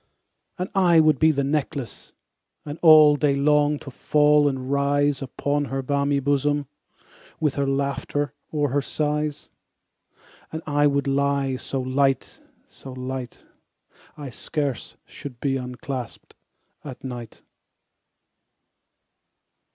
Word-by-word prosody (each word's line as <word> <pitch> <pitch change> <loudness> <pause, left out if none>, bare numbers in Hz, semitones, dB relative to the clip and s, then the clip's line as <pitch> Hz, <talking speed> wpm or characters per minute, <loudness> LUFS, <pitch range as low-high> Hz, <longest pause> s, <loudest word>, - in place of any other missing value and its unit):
And 180 0 -2
I 175 -4 +5
would 155 -4 +4
be 160 - +5
the 140 -3 +1
necklace, 140 -2 -3 0.5
And 150 +1 -7
all 155 -3 +8
day 145 -1 +2
long 150 +1 +3
to 140 - -10
fall 150 +2 +3
and 130 -1 -4
rise 140 0 +1
Upon 145 +2 -2
her 135 0 -3
balmy 140 +1 +1
bosom, 145 +1 0 0.3
15 - - -34 0.3
With 150 -4 +1
her 140 -1 -1
laughter 140 0 -1 0.2
or 145 -2 0
her 145 +1 +1
sighs: 150 0 -2 1.0
And 160 +1 -6
I 145 -1 +2
would 140 0 0
lie 140 -1 0
so 135 +1 -4
light, 135 +1 0 0.3
so 135 - -12
light, 130 -1 -6 0.7
I 145 -4 -7
scarce 140 -1 -4
should 125 -4 -10
be 135 0 0
unclasp'd 125 -1 -6 0.5
at 130 -4 -9
night. 120 -4 -8
140 Hz, 120 wpm, -24 LUFS, 135-150 Hz, 1.0 s, all